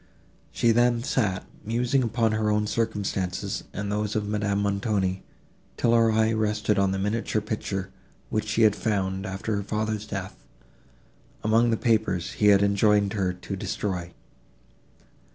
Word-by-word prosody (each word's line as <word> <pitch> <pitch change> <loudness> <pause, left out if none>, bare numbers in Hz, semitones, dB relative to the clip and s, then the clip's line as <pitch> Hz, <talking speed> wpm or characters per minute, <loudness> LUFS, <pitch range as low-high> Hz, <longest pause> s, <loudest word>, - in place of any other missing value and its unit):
She 115 - +2
then 120 0 +3
sat, 100 -8 0 0.2
musing 120 +5 +1
upon 115 -1 +1
her 110 0 0
own 105 0 +1
circumstances 105 -4 -2
and 100 0 -4
those 105 0 -1
of 105 -1 -1
Madame 105 -1 0
Montoni, 100 -2 0 0.6
till 115 - +2
her 115 -1 +4
eye 110 0 +2
rested 105 -1 +1
on 100 -1 +3
the 95 - -1
miniature 105 +3 -1
picture, 105 -3 -4 0.4
which 110 0 -1
she 115 +1 +2
had 105 -2 +5
found, 95 -2 -1
after 95 +3 -3
her - - -1
father's 110 +1 -2
death, 95 -2 -6 1.0
among 115 +2 +3
the 115 - +1
papers 110 -7 +1
he 105 - +1
had 100 -1 +6
enjoined 100 0 +3
her 95 -4 0
to 90 +2 -6
destroy. 90 -2 -3
105 Hz, 150 wpm, -26 LUFS, 100-110 Hz, 1.0 s, had